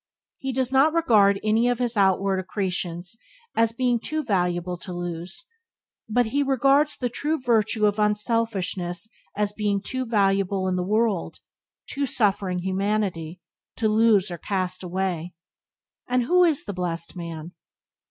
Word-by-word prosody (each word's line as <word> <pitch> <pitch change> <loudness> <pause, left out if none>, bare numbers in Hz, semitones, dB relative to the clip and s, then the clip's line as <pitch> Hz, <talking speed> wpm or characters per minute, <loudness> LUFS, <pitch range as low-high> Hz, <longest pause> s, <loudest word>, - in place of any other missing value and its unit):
He 265 - -3
does 260 0 0
not 275 +4 +4
regard 210 -11 +4
any 220 +3 +2
of 245 - +1
his 240 -1 -1
outward 195 -1 +2
accretions 185 0 -3 0.4
as 230 0 +3
being 245 0 +1
too 310 +6 -3
valuable 180 -5 0
to 185 - -8
lose, 175 - -5 0.6
but 245 +3 +2
he 275 +6 0
regards 275 +2 +3
the 280 +6 -2
virtue 220 -2 +2
of 205 0 +1
unselfishness 210 -4 0 0.3
as 210 0 0
being 205 -1 0
too 255 +5 -4
valuable 195 -3 +1
to 185 - 0
the 180 - 0
world 210 0 0 0.3
— - - -25
to 280 0 -1
suffering 195 -6 0
humanity 190 -3 -2 0.2
— - - -61
to 225 - +1
lose 215 -3 +3
or 170 - -6
cast 185 -1 -2
away. 180 -2 -3 0.7
And 250 0 +1
who 360 +8 +4
is 315 -5 +2
the 200 - -5
blessed 170 -2 -3
man? 170 -1 -7
205 Hz, 150 wpm, -24 LUFS, 185-235 Hz, 0.7 s, not